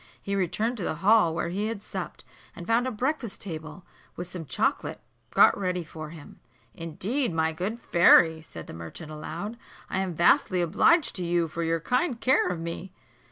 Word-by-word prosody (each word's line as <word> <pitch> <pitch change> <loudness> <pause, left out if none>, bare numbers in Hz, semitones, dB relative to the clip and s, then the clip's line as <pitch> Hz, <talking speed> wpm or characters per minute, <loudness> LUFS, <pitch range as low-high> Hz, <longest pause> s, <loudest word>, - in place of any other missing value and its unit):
He 200 - -3
returned 215 +6 0
to 200 - -4
the 160 - -1
hall, 210 -6 +5
where 170 - -1
he 200 +4 -1
had 220 -2 -5
supped, - - -6 0.3
and 170 - -8
found 235 +4 +2
a - - -1
breakfast 250 -1 -2
table, 165 0 -7 0.3
with 175 - -5
some 180 -2 -7
chocolate - - -1 0.3
got - - +6
ready 180 -2 -2
for 155 -1 -8
him. 155 -2 -12 0.3
"Indeed, 200 - -2
my 160 -1 0
good 195 +8 -3
fairy," 170 -5 +5
said 80 - -10
the - - -10
merchant 85 - -8
aloud, 170 +8 -6 0.3
"I 190 - 0
am 185 -3 -2
vastly 175 +2 +4
obliged 205 - +3
to 180 - -3
you 170 -1 +1
for 165 +2 -5
your 165 0 +1
kind 250 - 0
care 260 +2 +3
of 180 -2 -3
me." 170 +3 -6
180 Hz, 185 wpm, -27 LUFS, 165-215 Hz, 0.3 s, got